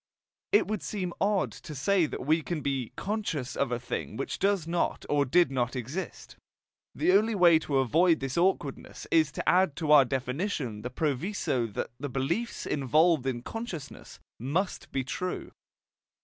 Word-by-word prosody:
It 415 - +5
would 215 -3 -2
seem 185 -4 -3
odd 200 -1 +2
to 155 - -9
say 170 +5 +2
that - - -6
we 160 +3 +3
can 160 0 -3
be 135 -5 -2
"conscious" 190 - -3
of 140 - 0
a 120 - -1
thing 125 - -5
which 135 - -4
does 195 -4 +1
not 170 0 -1
or 145 -1 +2
did 170 +3 +3
not 125 -1 -1
exist. 130 +9 -6 0.6
The - - +2
only 215 +3 +3
way 170 -4 +6
to 145 -3 -1
avoid 160 +6 +3
this 135 -1 -4
awkwardness 170 -6 -1
is 155 -2 +4
to - - -5
add 185 -5 +4
to 155 -3 -1
our 145 -3 +8
definition 130 - -2
the 125 - -4
proviso 145 - -1
that - - -3
the 145 +1 -4
beliefs 150 - -2
involved 150 +1 +2
in 120 -2 -2
consciousness 225 - -7 0.2
must 160 - -2
be 135 - -1
TRUE. 180 +8 -4
155 Hz, 165 wpm, -28 LUFS, 135-185 Hz, 0.6 s, our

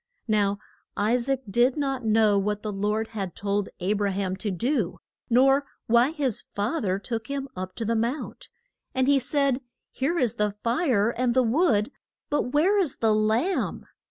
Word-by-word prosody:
Now 205 -2 +2 0.4
I 210 +3 +2
saac 260 +2 0
did 240 +6 +2
not 270 -3 -1
know 215 -2 +3
what 210 +1 -2
the 215 - -2
Lord 210 +3 -1
had 195 -5 -5
told 200 0 -1
A 190 +3 0
bra 205 -1 0
ham 190 -1 -2
to 205 - -3
do, 215 - -1 0.3
nor 270 +4 +4 0.2
why 235 +3 +4
his 285 -8 -1
fa 220 +11 -1
ther 190 -3 0
took 225 +2 -4
him 280 -1 -3
up 185 0 -6
to 230 - -3
the 230 +2 0
mount. 235 +6 -3 0.5
And 260 0 +2
he 280 -1 +5
said, 275 0 +1 0.3
Here 300 +7 -1
is 245 -8 0
the 210 -1 0
fire 235 - +2
and 245 0 0
the 260 - +5
wood, 235 - +2 0.4
but 290 -4 0
where 365 +9 +3
is 335 -9 0
the 220 -2 +2
lamb? 220 - 0
230 Hz, 180 wpm, -26 LUFS, 205-270 Hz, 0.5 s, he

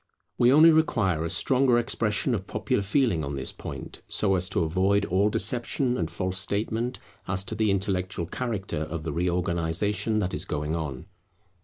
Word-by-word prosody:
We 120 +1 +5
only 155 +4 +8
require 110 - +2
a 85 - -2
stronger 125 +7 +2
expression 115 0 0
of 100 -4 -3
popular 110 +2 -1
feeling 100 - +1
on 70 0 -4
this 65 -2 -4
point, - - -8
so 100 -2 +1
as 90 0 +1
to 90 - 0
avoid 95 +5 +1
all 100 +3 +2
deception 120 +5 +1
and 85 -7 -2
false 90 +3 -2
statement 110 +5 -1 0.3
as 95 +1 0
to - - -4
the 110 0 +1
intellectual 95 -2 -1
character 100 -6 -3
of 80 0 -4
the 75 -1 -3
reorganization 90 +5 0
that 95 -3 -1
is - - -2
going 75 +2 -3
on. 75 -6 -5
95 Hz, 170 wpm, -26 LUFS, 85-115 Hz, 0.3 s, only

